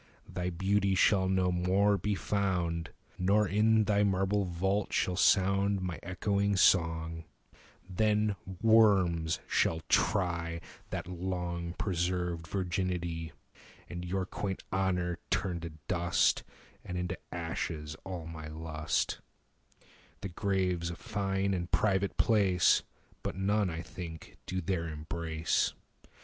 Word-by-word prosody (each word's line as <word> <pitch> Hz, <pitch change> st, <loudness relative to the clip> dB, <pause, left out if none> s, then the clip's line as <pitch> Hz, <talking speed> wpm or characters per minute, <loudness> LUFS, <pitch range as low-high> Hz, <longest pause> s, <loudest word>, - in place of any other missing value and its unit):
Thy 90 Hz, 0 st, -3 dB
beauty 95 Hz, +2 st, +1 dB
shall 95 Hz, 0 st, +4 dB
no 95 Hz, -1 st, +2 dB
more 95 Hz, +4 st, +3 dB
be 100 Hz, +2 st, -1 dB
found, 90 Hz, -5 st, -1 dB, 0.3 s
25 -, -, -28 dB
Nor, 100 Hz, +3 st, +3 dB
in 110 Hz, +2 st, +4 dB
thy 105 Hz, 0 st, +2 dB
marble 95 Hz, +1 st, +1 dB
vault, 95 Hz, +4 st, -1 dB
shall 90 Hz, -, +1 dB
sound 100 Hz, +1 st, +3 dB
My 90 Hz, -3 st, -4 dB
echoing 100 Hz, +3 st, 0 dB
song: 80 Hz, -3 st, +2 dB, 0.6 s
then 105 Hz, +2 st, +1 dB, 0.3 s
worms 95 Hz, -8 st, +4 dB
shall 80 Hz, 0 st, +1 dB
try 85 Hz, -3 st, +1 dB, 0.3 s
That -, -, -4 dB
long 90 Hz, -1 st, -3 dB
preserved 90 Hz, -3 st, -1 dB
virginity, 85 Hz, -3 st, -2 dB, 0.6 s
And 85 Hz, 0 st, -6 dB
your 95 Hz, +1 st, -1 dB
quaint 95 Hz, +1 st, -4 dB
honour 90 Hz, -2 st, 0 dB
turn 90 Hz, -2 st, 0 dB
to 85 Hz, 0 st, -6 dB, 0.2 s
dust, 85 Hz, -1 st, +2 dB, 0.4 s
And 90 Hz, -, -5 dB
into 90 Hz, 0 st, -3 dB
ashes 80 Hz, -3 st, -4 dB
all 90 Hz, -4 st, -6 dB
my 80 Hz, -2 st, -7 dB
lust: 80 Hz, 0 st, -2 dB, 0.6 s
30 -, -, -27 dB, 0.3 s
The 100 Hz, -, -4 dB
grave 90 Hz, -1 st, 0 dB
's 85 Hz, -, -1 dB
a 85 Hz, -, -5 dB
fine 100 Hz, -2 st, -1 dB
and 85 Hz, -1 st, -2 dB
private 100 Hz, -2 st, +1 dB
place, 100 Hz, -5 st, +4 dB, 0.4 s
But -, -, -4 dB
none, 100 Hz, +1 st, +1 dB
I 80 Hz, 0 st, -4 dB
think, 85 Hz, -3 st, -9 dB
do 95 Hz, 0 st, -2 dB
there 85 Hz, -2 st, -1 dB
embrace. 80 Hz, +1 st, -1 dB
90 Hz, 125 wpm, -31 LUFS, 85-100 Hz, 0.6 s, shall